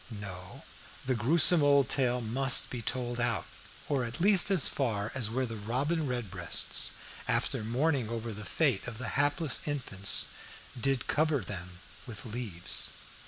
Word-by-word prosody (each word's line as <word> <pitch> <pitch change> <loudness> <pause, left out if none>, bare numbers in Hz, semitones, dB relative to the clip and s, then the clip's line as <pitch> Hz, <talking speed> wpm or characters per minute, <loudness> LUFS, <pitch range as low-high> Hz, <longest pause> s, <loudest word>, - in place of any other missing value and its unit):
No, 95 -5 -8 0.4
the 130 - +1
gruesome 150 +8 +5
old 140 -2 +4
tale 125 -2 +1
must 125 +3 +4
be 125 - -4
told 120 +1 -2
out, 120 -2 0 0.4
or 140 -3 0
at 115 0 -6
least 195 +1 +6
as 190 -8 +3
far 110 -6 -2
as 120 -6 0
where 130 +3 -1
the 115 -2 -6
robin 140 +9 -1
redbreasts, 95 -8 -1 0.3
after - - 0
mourning 130 +1 0
over 115 -1 -4
the 105 +1 -8
fate 135 -3 0
of 120 -3 -6
the 125 -2 -5
hapless 145 +1 +1
infants 115 -9 +1 0.5
"did 130 +1 -1
cover 155 -3 +1
them 90 -2 -8 0.3
with 110 -2 -8
leaves." 105 -6 -4
120 Hz, 150 wpm, -30 LUFS, 110-140 Hz, 0.5 s, least